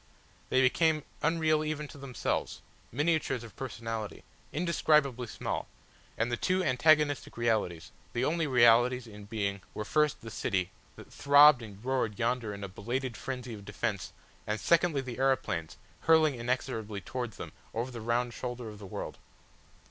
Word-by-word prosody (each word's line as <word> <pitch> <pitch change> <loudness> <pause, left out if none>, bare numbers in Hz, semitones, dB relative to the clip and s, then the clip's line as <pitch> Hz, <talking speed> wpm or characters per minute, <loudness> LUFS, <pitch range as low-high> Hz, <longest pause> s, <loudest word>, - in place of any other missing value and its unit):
They 130 - +4
became 155 +3 +3 0.2
unreal 155 -1 +2
even 150 -1 -3
to - - -11
themselves, 135 -2 -3 0.3
miniatures 145 -2 0
of 115 - -12
personality, 115 -4 -5 0.3
indescribably 150 -6 +2
small, - - -4 0.5
and 115 +2 0
the 120 - 0
two 185 +6 +1
antagonistic 145 +1 +3
realities, 110 -8 0 0.2
the 120 +2 0
only 165 +1 +1
realities 125 0 +5
in 105 -2 -11
being 100 -2 -2
were 105 - -3
first 150 +4 +1
the 115 - -8
city, 95 -4 -1 0.2
that - - -13
throbbed 145 -1 +7
and 105 0 -11
roared 130 -6 0
yonder 120 -2 0
in 100 0 -7
a - - -3
belated 120 +6 -3
frenzy 125 -1 -5
of 105 -2 -9
defence 105 0 -3 0.4
and 105 +1 -1
secondly 170 -4 +3
the 130 -1 -7
aeroplanes 130 -12 0 0.2
hurling 160 -2 +4
inexorably 120 -4 -3
towards 120 0 -5
them - - -7 0.2
over 120 +3 -2
the 120 -2 -7
round 120 +2 0
shoulder 125 -2 -5
of 105 -1 -11
the 100 - -9
world. - - -6
125 Hz, 155 wpm, -30 LUFS, 110-145 Hz, 0.5 s, throbbed